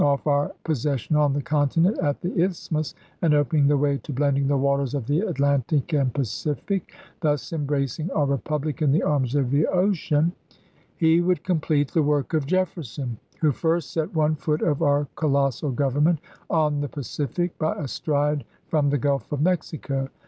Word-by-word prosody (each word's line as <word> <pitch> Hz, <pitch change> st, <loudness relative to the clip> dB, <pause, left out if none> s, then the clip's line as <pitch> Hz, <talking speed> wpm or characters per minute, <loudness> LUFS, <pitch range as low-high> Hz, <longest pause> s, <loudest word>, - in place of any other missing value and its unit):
off 140 Hz, -1 st, +2 dB
our 145 Hz, -1 st, +2 dB
possession 145 Hz, -2 st, -1 dB
on 150 Hz, -1 st, +4 dB
the 145 Hz, +1 st, -1 dB
continent 155 Hz, -, +2 dB
at 145 Hz, -1 st, 0 dB
the 180 Hz, -, -3 dB
Isthmus, 160 Hz, -5 st, -2 dB, 0.3 s
and 160 Hz, -4 st, +4 dB
opening 145 Hz, 0 st, +3 dB
the 145 Hz, 0 st, +3 dB
way 140 Hz, 0 st, +1 dB
to 150 Hz, -, -8 dB
blending 140 Hz, 0 st, +1 dB
the 140 Hz, 0 st, +2 dB
waters 140 Hz, 0 st, +1 dB
of 135 Hz, -5 st, -2 dB
the 145 Hz, +6 st, +1 dB
Atlantic 140 Hz, -, 0 dB
and 135 Hz, -4 st, +2 dB
Pacific, 145 Hz, -, -2 dB, 0.3 s
thus 150 Hz, -4 st, -1 dB
embracing 145 Hz, +1 st, -1 dB
our 150 Hz, -5 st, +1 dB
Eepublic 150 Hz, +3 st, -2 dB
in 145 Hz, -3 st, +3 dB
the 155 Hz, -, +2 dB
arms 135 Hz, -3 st, +1 dB
of 135 Hz, -4 st, +1 dB
the 145 Hz, +2 st, +3 dB
ocean, 175 Hz, -4 st, +2 dB, 0.7 s
he 165 Hz, +1 st, +4 dB
would 180 Hz, 0 st, +1 dB
complete 155 Hz, -5 st, +1 dB
the 165 Hz, -, +2 dB
work 145 Hz, +1 st, 0 dB
of 155 Hz, -4 st, +1 dB
Jefferson, 145 Hz, -, -2 dB, 0.2 s
who 155 Hz, -2 st, +3 dB
first 165 Hz, +2 st, -1 dB
set 160 Hz, +2 st, -2 dB
one 155 Hz, 0 st, +2 dB
foot 150 Hz, +1 st, -1 dB
of 150 Hz, -3 st, +1 dB
our 145 Hz, -2 st, +2 dB
co 155 Hz, -, -1 dB
lossal 140 Hz, -1 st, +1 dB
Government 145 Hz, +5 st, +2 dB, 0.3 s
on 150 Hz, -3 st, +1 dB
the 145 Hz, -, -3 dB
Pacific 145 Hz, +5 st, -3 dB
by 155 Hz, -, 0 dB
a 150 Hz, -, -4 dB
stride 145 Hz, +1 st, 0 dB, 0.2 s
from 150 Hz, -3 st, +1 dB
the 145 Hz, -, +2 dB
G 145 Hz, -, -1 dB
ulf 140 Hz, -2 st, -1 dB
of 145 Hz, -, -1 dB
Mexico. 150 Hz, -5 st, -1 dB
145 Hz, 180 wpm, -24 LUFS, 140-160 Hz, 0.7 s, on